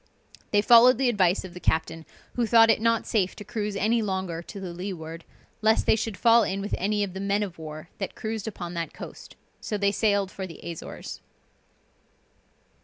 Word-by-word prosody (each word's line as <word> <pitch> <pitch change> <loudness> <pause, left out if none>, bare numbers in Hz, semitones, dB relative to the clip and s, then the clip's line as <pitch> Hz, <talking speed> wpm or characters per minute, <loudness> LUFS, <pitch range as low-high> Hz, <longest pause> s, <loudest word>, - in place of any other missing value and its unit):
They 205 0 +3
followed 240 +2 +7
the 265 -1 +2
advice 190 -4 +2
of 180 - -10
the 180 - -8
captain, 160 -1 -1 0.3
who 240 -2 0
thought 225 0 +7
it - - 0
not 230 -1 +2
safe 195 -5 0
to - - -9
cruise 210 0 -3
any 225 +4 +2
longer 190 -5 -3
to 200 +3 -9
the 185 -3 -6
leeward, 170 -3 -6 0.4
lest 220 0 +3
they - - +5
should 220 -2 -3
fall 230 +4 +5
in 195 -2 -1
with 205 +1 -4
any 205 +2 +1
of 190 -3 -4
the 190 - -6
men 200 +1 0
of 180 -5 -7
war 155 0 -8
that 195 - -4
cruised 220 -1 -4
upon 175 -5 -6
that 170 -1 -4
coast, - - -10 0.2
so 210 - -3
they 200 0 +2
sailed 200 -2 +1
for 190 -1 -6
the 165 - -11
Azores. 170 -2 -7
200 Hz, 195 wpm, -26 LUFS, 180-220 Hz, 0.4 s, followed